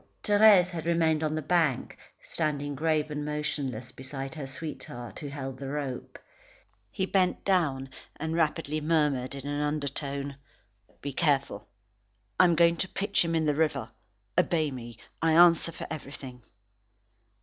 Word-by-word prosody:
Thérèse 205 -3 +6
had 165 -2 -5
remained 160 -2 +2
on 155 0 0
the 155 - -2
bank, 160 -5 +1 0.2
standing 145 -2 -2
grave 155 +1 0
and 150 0 -3
motionless 145 -5 -2
beside 135 +1 -6
her 150 -4 -6
sweetheart, 130 -4 -7
who 145 - -6
held 135 -2 -6
the 135 -1 -5
rope. 140 -3 -4 0.7
He 190 - -1
bent 185 -1 +1
down, 155 -9 +1 0.3
and 160 +2 -3
rapidly 155 -2 0
murmured 150 -5 +1
in 140 0 -7
an 145 0 -2
undertone: 140 -1 -3 0.6
"Be 140 -1 -4
careful. 140 -9 0 0.7
I 185 - +8
am 170 -2 +4
going 170 +1 +4
to 190 - -2
pitch 200 -1 +1
him 165 0 -1
in 160 -1 +2
the 150 - +3
river. 155 0 0 0.4
Obey 155 -4 +2
me. 120 -3 -8 0.2
I 165 -1 +3
answer 170 0 +6
for - - -7
everything." 135 -4 -8
150 Hz, 150 wpm, -28 LUFS, 140-165 Hz, 0.7 s, I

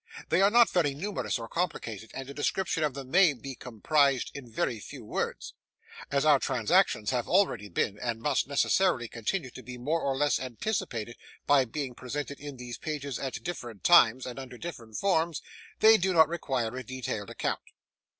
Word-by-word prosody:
They 170 +4 +3
are 200 - +6
not 235 +1 +5
very 145 -6 +1
numerous 195 +2 -2
or 115 -1 -7
complicated, 115 - -3
and 135 -1 -6
a 140 - -7
description 165 +3 -1
of 145 -4 0
them 135 -2 -8
may 180 -4 +6
be 135 +1 -8
comprised 130 +3 +1
in 135 -4 -9
very 115 0 -1
few - - -10
words. - - -3 0.6
As 140 +1 +1
our 150 -3 +6
transactions 130 - +2
have 125 -2 -1
already 180 - +2
been, 100 +1 -1
and 120 -2 -2
must 135 +3 0
necessarily 140 -1 +2
continue 130 - -3
to 130 - -10
be, 125 -1 -9
more 155 +7 -1
or 135 -1 -1
less 145 +1 +2
anticipated 120 - -3 0.3
by 140 -2 +5
being 135 +1 -4
presented 140 +3 -5
in 145 -2 -8
these 125 -1 -7
pages 145 -4 -4
at 135 -2 -4
different 120 - -6
times, 130 -8 +6
and 125 +1 -6
under 125 -2 -9
various 115 -9 -7
forms, 170 -4 +1 0.4
they 220 0 +8
do 185 0 0
not 160 -2 +7
require 130 -8 -2
a 130 - -5
detailed 120 -4 -5
account. - - -2
135 Hz, 180 wpm, -29 LUFS, 120-165 Hz, 0.6 s, they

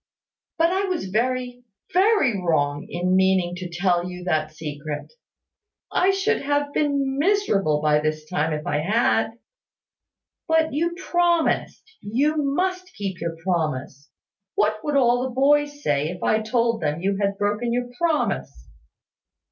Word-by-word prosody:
But 330 +1 +3
I 385 +2 +1
was 360 - -3
very, 245 +2 -1 0.3
very 365 - +3
wrong 145 -4 0
in 180 +2 0
meaning 190 -2 +3
to 180 -1 -6
tell 175 +1 0
you 180 0 -8
that 155 -3 0
secret. 150 - -6 0.8
I 365 - +3
should 390 +3 +1
have 285 0 -1
been 280 -2 0
miserable 215 - +2
by 150 -1 +4
this 155 0 -2
time 160 -1 -1
if 150 0 -3
I 145 0 0
had." 220 +5 +1 1.1
"But 320 -2 +2
you 340 +4 0
promised. 345 -2 +1 0.2
You 270 +9 +1
must 370 +6 -1
keep 195 -3 -5
your 170 -1 -3
promise. 150 -5 -2 0.5
What 215 +1 +1
would 295 -2 0
all 245 -2 +3
the 255 -1 -4
boys 290 +2 +2
say, 145 +1 +1
if 180 +1 -7
I 220 - +2
told 230 0 0
them 155 +1 -1
you 195 +1 0
had 200 0 0
broken 210 +4 -1
your 245 +1 -1
promise?" 335 -3 -1
220 Hz, 145 wpm, -23 LUFS, -, 1.1 s, by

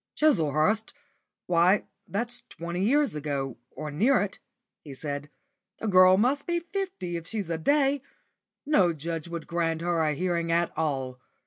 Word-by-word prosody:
"Chislehurst! 210 - +2 0.5
Why 180 +3 +3 0.2
that's 240 +4 -2
twenty 170 +2 -4
years 285 +6 +3
ago, 140 -4 -3
or 150 -1 -6
near 230 - +3
it," 200 -1 -3 0.4
he 140 -3 -9
said. 145 0 -5 0.5
"The 225 - -4
girl 185 -1 +7
must 265 +7 +1
be 345 0 +1
fifty 340 - -4
if 165 0 -8
she's 205 -5 -3
a 165 - -1
day. 280 - +2 0.6
No 195 - +4
judge 165 +1 -4
would 170 -2 -6
grant 165 -1 -1
her 170 -1 +1
a 155 -2 +1
hearing 170 0 -1
at 170 +1 +1
all. 135 -5 -2
175 Hz, 150 wpm, -27 LUFS, 160-225 Hz, 0.6 s, girl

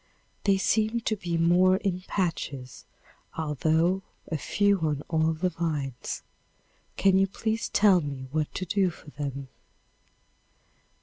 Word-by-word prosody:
They 195 -1 +4
seem 220 +3 +1
to 220 - 0
be 175 -4 -2
more 175 +3 +5
in 190 -3 -2
patches, 145 - -3 0.5
although 160 +4 +1 0.3
a - - +1
few 200 +6 +2
on 150 -3 -1
all 160 0 +2
the 170 +3 0
vines. 150 -7 -3 0.7
Can 190 -1 +4
you 195 - +4
please 220 +3 -2
tell 200 -4 +5
me 140 -3 -5
what 155 0 -1
to 185 - -2
do 190 +1 +2
for 155 -3 -13
them? 140 -2 -5
170 Hz, 130 wpm, -27 LUFS, 150-195 Hz, 0.7 s, more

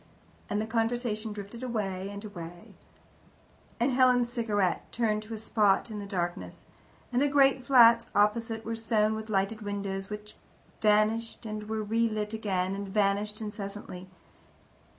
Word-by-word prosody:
And 205 - 0
the 215 - -1
conversation 225 -1 -1
drifted 205 +3 -8
away 200 -6 -3
and 200 +1 -7
away, 175 -4 -9 1.1
and 245 +3 +2
Helen's 250 -1 +3
cigarette 210 -6 0
turned 215 -3 0
to 220 +1 -7
a - - -6
spot 215 0 +2
in 210 - -5
the 200 - -6
darkness, 175 - -4 0.5
and 245 - +3
the 290 - +4
great 275 -2 +4
flats 235 -3 +6
opposite 225 +2 +1
were 230 - -2
sown 220 -1 +1
with 220 0 -6
lighted 205 +2 0
windows, 200 -1 -4
which 210 0 -8 0.4
vanished 215 +2 +2
and 215 -1 -5
were 220 -1 -1
relit 215 -1 0
again, 190 -4 -1
and 200 0 -4
vanished 210 +1 +1
incessantly. 200 -3 -7
215 Hz, 145 wpm, -29 LUFS, 200-230 Hz, 1.1 s, flats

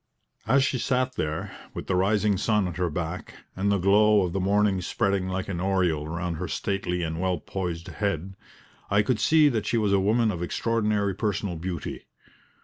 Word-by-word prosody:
As 135 0 +4
she 135 -2 0
sat 130 +1 0
there, 80 0 -3 0.2
with - - -5
the 95 - 0
rising 100 +2 +2
sun 105 0 +1
at 85 - -6
her 90 -1 0
back, 85 +2 -5 0.2
and 100 +2 0
the 100 - +3
glow 105 +2 +4
of 90 -2 -2
the 95 - 0
morning 100 0 +2
spreading 95 +1 0
like 95 0 -3
an 90 -3 -3
aureole 90 -6 +1
around 85 +1 -3
her - - -3
stately 90 -3 -2
and 80 +1 -3
well 95 -1 +1
poised 85 0 -4
head, 95 -1 -2 0.6
I 100 +1 +3
could 115 0 0
see 155 +5 +5
that 110 -6 -2
she 120 - +1
was 105 -3 +2
a 100 - +4
woman 110 +3 +2
of 85 - -5
extraordinary 105 +1 0
personal 100 -2 -2
beauty. 85 +1 -5
95 Hz, 190 wpm, -26 LUFS, 90-105 Hz, 0.6 s, see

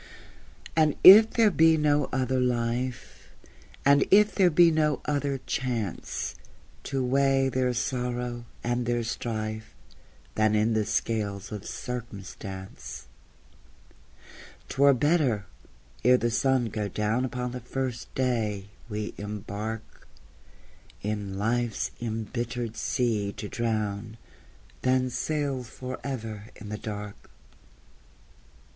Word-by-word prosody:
And 155 -2 +3
if 215 +4 +11
there 225 -3 +4
be 160 -2 +5
no 150 -1 +3
other 130 0 0
life, 125 0 -2 0.6
And 140 0 +6
if 210 0 +6
there 185 -2 +4
be 170 +1 +6
no 155 -2 +2
other 145 -2 0
chance 115 -7 -3 0.5
To 135 -2 -1
weigh 135 +1 +3
their 130 -1 +1
sorrow 125 -1 -2 0.2
and 120 0 -1
their 120 -1 +1
strife 110 -1 -4 0.6
Than 110 0 +2
in 110 +2 +2
the 110 -1 +1
scales 100 -4 -2
of 105 -1 -6
circumstance, 95 - -7 1.6
'T 135 - -3
were 140 -1 +7
better, 135 -7 +2 0.6
ere 125 +2 +6
the 120 -1 0
sun 130 0 +2
go 105 0 -2
down 105 +5 0
Upon 125 -1 -3
the 125 - -5
first 125 0 -4
day 110 -6 -1 0.2
we 105 0 -4
embark, 105 +2 -6 1.0
In 100 -2 -3
life's 115 +1 0
imbittered 120 +1 -3
sea 110 -6 0
to 105 - -6
drown, 110 -1 -2 0.6
Than 130 0 +2
sail 145 -1 -1
forever 125 -3 -6
in 105 - -10
the 105 0 -4
dark. 105 -1 -7
120 Hz, 110 wpm, -27 LUFS, 110-130 Hz, 1.6 s, if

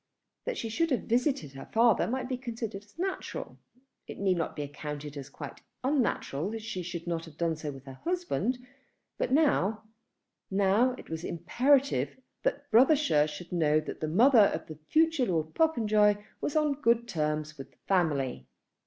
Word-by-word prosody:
That - - -2
she 230 - -3
should 330 +10 0
have 260 - 0
visited 240 - 0
her 135 - -9
father 230 0 +4
might 255 +2 -2
be 260 - -1
considered 230 -5 -5
as 205 +6 -25
natural. 380 +2 -4 0.5
It - - -8
need 195 -2 +2
not 165 -2 -2
be 150 - -3
accounted 145 0 -6
as 140 -1 -7
quite 145 -1 -9 0.2
unnatural 245 - 0
that 220 0 -5
she 215 -4 -4
should 175 -1 -5
have 165 -3 -4
done 165 -1 0
so 150 -1 -5
without 135 -1 -11
her - - -28
husband. 345 - 0 0.6
But - - 0
now, 265 - +2 0.7
now 200 +6 +3
it - - -12
was 160 +1 -4
imperative 240 - +1 0.2
that 285 0 -2
Brothershire 245 - +5
should 155 +3 -8
know 155 -3 +3
that 155 - -6
the 155 - -2
mother 225 - +6
of 160 - -6
the 155 -1 -10
future 320 -5 +3
Lord 160 -3 -1
Popenjoy 215 -9 +3 0.3
was 295 - -2
on 295 -2 +1
good 235 -1 +3
terms 155 -4 -2
with 135 0 -8
the 125 - -31
family. 145 - +1
200 Hz, 170 wpm, -29 LUFS, 155-255 Hz, 0.7 s, mother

